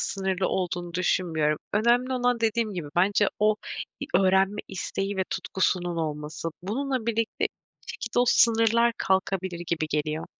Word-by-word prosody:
sınırlı 190 -1 -1
olduğunu 175 -2 -2
düşünmüyorum. 160 -4 +1
Önemli 240 +4 +3
olan 245 -1 +1
dediğim 225 -1 +1
gibi 165 -5 -4
bence 200 +3 +3
o 215 0 +3 0.5
i - - -3
öğrenme 190 +2 +3
isteği 195 +1 -3
ve 190 - +1
tutkusunun 175 -2 -1
olması. 155 0 -3
Bununla 255 +4 -2
birlikte 230 -1 0
bir - - -10
şekilde 240 -1 -4
o 245 - +4
sınırlar 230 0 +4
kalkabilir 190 -2 0
gibi 160 -2 -1
geliyor. 155 +1 -2
190 Hz, 140 wpm, -26 LUFS, 175-225 Hz, 0.5 s, o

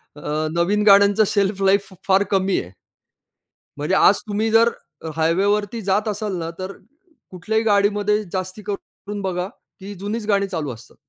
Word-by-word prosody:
अ, 150 +1 -3
नवीन 175 +5 +1
गाण्यांचं 200 +1 +6
शेल्फलाईफ 195 0 +1 0.2
फार 195 +1 +4
कमी 190 -1 +2
आहे. 90 - -12 1.1
म्हणजे 150 +6 0
आज 200 +1 +5
तुम्ही 215 +2 0
जर 230 +1 +5 0.3
अ, 160 - -4
हायवेवरती 200 +7 +1
जात 200 +3 0
असाल 210 -2 -2
ना, 165 -1 -4
तर 185 +1 -4 0.6
कुठल्याही 220 +5 -1
गाडीमध्ये 210 0 +2
जास्ती 185 +2 -4
करून 205 0 -7
बघा, 185 -1 -2 0.3
ती 200 +2 -7
जुनीच 210 +2 -4
गाणी 200 -1 +2
चालू 160 -7 -4
असतात. 115 - -15
200 Hz, 145 wpm, -21 LUFS, 185-210 Hz, 1.1 s, गाण्यांचं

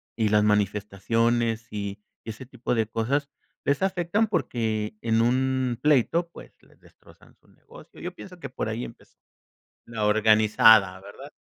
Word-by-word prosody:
y 110 -2 +1
las 105 0 +3
manifestaciones, 105 +3 0
y 100 -1 -5 0.2
ese 110 +3 -8
tipo 125 -1 -3
de 110 -2 0
cosas 130 +6 -1 0.3
les 140 - 0
afectan 190 +3 0
porque 110 - -2
en 115 0 +1
un 130 0 0
pleito 150 +4 +2
pues, - - -14
les - - -25
destrozan - - -21
su - - -29
negocio. - - -17
Yo - - -6
pienso 180 -2 -12
que - - -7
por 125 - -4
ahí 115 +3 -4
empezó, 115 - -15 0.7
la 115 -2 -3
organizada, 110 -2 +5
¿verdad? 100 +9 -12
115 Hz, 145 wpm, -25 LUFS, 105-130 Hz, 0.7 s, organizada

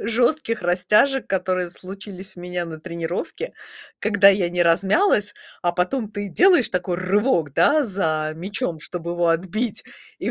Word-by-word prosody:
жёстких 230 - 0
растяжек, 210 +10 +2
которые 185 -2 -1
случились 190 +1 -8
у 175 - -10
меня 180 0 -4
на 160 -2 -8
тренировке, 170 - -5 0.5
когда 200 -2 +5
я 190 -3 +3
не 175 0 0
размялась, 205 - +2 0.3
а 175 - +1
потом 205 +7 -1
ты 205 -1 -5
делаешь 355 - +4
такой 180 -1 -2
рывок, 185 - +1
да, 295 - +3
за 160 -7 -1
мячом, 180 0 -3
чтоб 170 +2 -6
его 175 0 0
отбить, 190 +7 -1 0.3
и - - -2
185 Hz, 145 wpm, -22 LUFS, 175-215 Hz, 0.5 s, когда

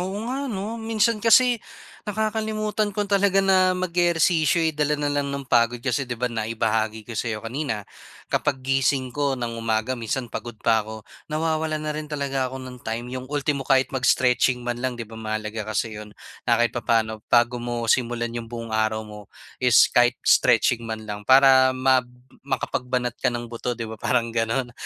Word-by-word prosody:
oo 190 +2 -3
nga 270 +3 -3
'no. 220 +2 -4
Minsan 225 0 +1
kasi 235 +1 +5 0.5
nakakalimutan 215 0 -1
ko 205 +1 -2
talaga 195 -1 +2
na 185 -1 +4
mag-ehersisyo 170 -2 +2
eh, 160 - +1
dala 150 0 0
na 145 0 -1
lang 145 -1 -1
ng 140 0 -4
pagod 120 -1 +2
kasi 130 +1 -2
'di 125 - -3
ba 125 - -3
naibahagi 110 -1 -1
ko 115 - -9
sayo 115 -1 -3
kanina, 120 -4 -3 0.5
kapag 130 -1 0
gising 135 -1 +1
ko 140 -1 0
ng 120 -1 -3
umaga 110 +2 0
minsan 120 0 -4
pagod 120 -2 -6
pa 110 +1 +2
ako, 110 0 -9 0.2
nawawalan 155 0 -1
na 150 - -1
rin 150 0 -6
talaga 135 -3 -2
ako 130 0 -8
ng 125 -1 -9
time. 120 +2 -5
'Yung 130 0 -6
ultimo 145 -1 -1
kahit 135 0 +2
mag-stretching 125 -1 +2
man 120 0 -3
lang 130 -1 -2
'di 115 - -5
ba 110 +1 -11
mahalaga 110 0 -4
kasi 110 +1 -1
'yon, 105 0 -12 0.3
na 115 - +5
kahit 120 0 +1
papaano 110 -2 0
bago 120 0 +3
mo 120 -1 -3
simulan 120 -2 -1
'yong 115 -1 -6
buong 115 -1 -7
araw 110 0 0
mo 105 -1 -11 0.3
is 125 -2 +6
kahit 120 0 +4
stretching 120 - +4
man 110 -1 -5
lang 105 -1 -7
para 130 -1 +6
ma 130 0 +4 0.4
makapagbanat 125 -2 -2
ka 130 - +2
ng 120 -1 -4
buto 120 +1 -3
'di 115 - -4
ba, 110 -1 -8
parang 115 -2 0
gano'n. 115 +2 -1
125 Hz, 180 wpm, -24 LUFS, 115-150 Hz, 0.5 s, is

